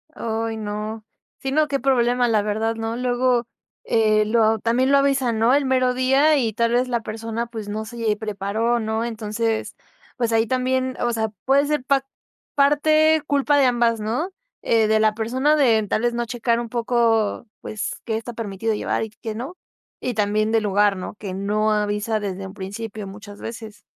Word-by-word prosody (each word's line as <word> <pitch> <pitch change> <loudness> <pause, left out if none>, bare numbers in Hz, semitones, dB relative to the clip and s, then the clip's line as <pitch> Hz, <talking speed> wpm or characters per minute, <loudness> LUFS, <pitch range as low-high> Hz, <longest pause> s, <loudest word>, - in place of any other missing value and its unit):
Ay, 225 0 -3
no. 215 +1 -5 0.3
Si, 270 - -4
no, 305 +2 +3
qué 275 -1 -1
problema, 245 -1 +2
la 220 -3 +2
verdad, 220 +2 -1
¿no? 225 +1 -3
Luego, 245 -1 +1 0.4
eh, 215 -1 +3
lo 220 0 +3
también 245 +5 +1
lo 280 - +6
avisan, 270 -4 +2
¿no?, 230 +3 +4
el 285 0 +3
mero 255 -1 +2
día, 270 +4 +3
y 230 -4 +1
tal 230 +2 +1
vez, 250 +1 +2
la 240 -2 -1
persona, 225 +1 -4
pues, 220 -3 -7
no 215 +1 -3
se 225 -2 -2
preparó, 215 +3 -1
¿no? 220 +1 -1
Entonces, 225 0 -2 0.4
pues, 235 -2 0
ahí 225 0 +3
también. 255 +1 0
O 240 0 0
sea, 220 -1 -1 0.2
puede 275 +2 +4
ser 300 -3 0
pa 275 0 +2 0.5
parte 310 +2 +4
culpa 285 +1 +2
de 280 - +5
ambas, 235 -2 +2
¿no? 250 - -2 0.3
Eh, 225 -2 +3
de 220 0 +3
la 215 -1 +3
persona, 255 +7 +1
de 230 -7 +3
tal 215 - 0
vez, 240 0 +1
no 240 0 -1
checar 235 0 0
un 235 -1 -5
poco, 230 -2 +1 0.2
pues, 215 -1 -4
qué 220 -2 -2
está 235 +2 -6
permitido 220 -1 -3
llevar, 210 - -1
y 220 - -6
qué 220 -2 -4
no. 265 +11 -6 0.4
Y 250 -2 -2
también 215 +1 +1
del 225 -1 +2
lugar, 205 0 +2
¿no?, 185 - -6
que 195 -3 -5
no 210 +2 0
avisa 210 +1 0
desde 195 -2 -4
un 190 - -10
principio, 205 +1 -6
muchas 205 +1 -10
veces. 220 -2 -8
230 Hz, 190 wpm, -22 LUFS, 215-250 Hz, 0.5 s, lo